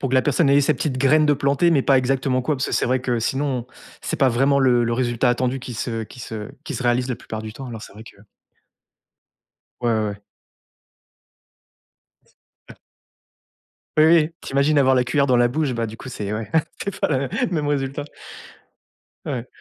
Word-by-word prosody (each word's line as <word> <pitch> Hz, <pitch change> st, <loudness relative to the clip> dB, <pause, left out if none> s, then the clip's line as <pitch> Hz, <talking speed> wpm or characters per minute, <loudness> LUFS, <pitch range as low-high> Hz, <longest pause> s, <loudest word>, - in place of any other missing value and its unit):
pour 135 Hz, -, -1 dB
que 130 Hz, -, -1 dB
la 130 Hz, -, +4 dB
personne, 150 Hz, +1 st, +2 dB
elle 140 Hz, -, +5 dB
ait -, -, +4 dB
sa 145 Hz, +2 st, +2 dB
petite 135 Hz, -4 st, -2 dB
graine 150 Hz, +4 st, +4 dB
de 150 Hz, -, +4 dB
plantée, 140 Hz, +4 st, +2 dB
mais 145 Hz, -5 st, +3 dB
pas 135 Hz, -, +4 dB
exactement 130 Hz, 0 st, 0 dB
quoi, 150 Hz, +3 st, 0 dB
parce 130 Hz, -, -1 dB
que -, -, -5 dB
c'est -, -, +1 dB
vrai 130 Hz, +1 st, +1 dB
que 125 Hz, -2 st, -1 dB
sinon 135 Hz, 0 st, -1 dB, 0.4 s
c'est -, -, -3 dB
pas 135 Hz, -, +4 dB
vraiment 135 Hz, +4 st, +2 dB
le 125 Hz, -3 st, +3 dB
le 120 Hz, 0 st, 0 dB
résultat 120 Hz, 0 st, +1 dB
attendu 125 Hz, +2 st, 0 dB
qui 125 Hz, -1 st, -7 dB
se 115 Hz, 0 st, -3 dB
qui 110 Hz, -, -12 dB
se 110 Hz, -2 st, -6 dB
qui 150 Hz, -, -5 dB
se 125 Hz, -, -4 dB
réalise 125 Hz, +1 st, +1 dB
la 125 Hz, -, -2 dB
plupart 110 Hz, 0 st, -7 dB
du 110 Hz, -, -7 dB
temps, 135 Hz, +4 st, -9 dB
alors 115 Hz, -3 st, -7 dB
c'est -, -, -11 dB
vrai 105 Hz, -, -12 dB
que 115 Hz, -, -15 dB, 1.6 s
Ouais, 120 Hz, -, 0 dB
ouais, 110 Hz, -2 st, +1 dB
ouais. 100 Hz, 0 st, -10 dB, 2.1 s
S -, -, -33 dB, 0.3 s
a -, -, -11 dB, 1.2 s
Oui, 155 Hz, -, +7 dB
oui. 160 Hz, -1 st, +5 dB
Tu -, -, -8 dB
imagines 140 Hz, +2 st, +3 dB
avoir 130 Hz, -1 st, +4 dB
la 125 Hz, -1 st, +2 dB
cuillère 140 Hz, +3 st, +1 dB
dans 130 Hz, -2 st, +3 dB
la 120 Hz, 0 st, +4 dB
bouche, 145 Hz, +2 st, -1 dB
bah, 115 Hz, -1 st, -1 dB
du 110 Hz, +1 st, -9 dB
coup 130 Hz, -, -10 dB
c'est 105 Hz, -5 st, -5 dB
ouais, 105 Hz, 0 st, -4 dB, 0.3 s
c'est 200 Hz, -, -5 dB
pas -, -, +1 dB
la -, -, +1 dB
mê 135 Hz, 0 st, -2 dB, 0.2 s
même 155 Hz, -5 st, -1 dB
résultat. 140 Hz, 0 st, -2 dB, 1.2 s
Ouais. 125 Hz, -4 st, -4 dB
130 Hz, 215 wpm, -22 LUFS, 120-140 Hz, 2.1 s, Oui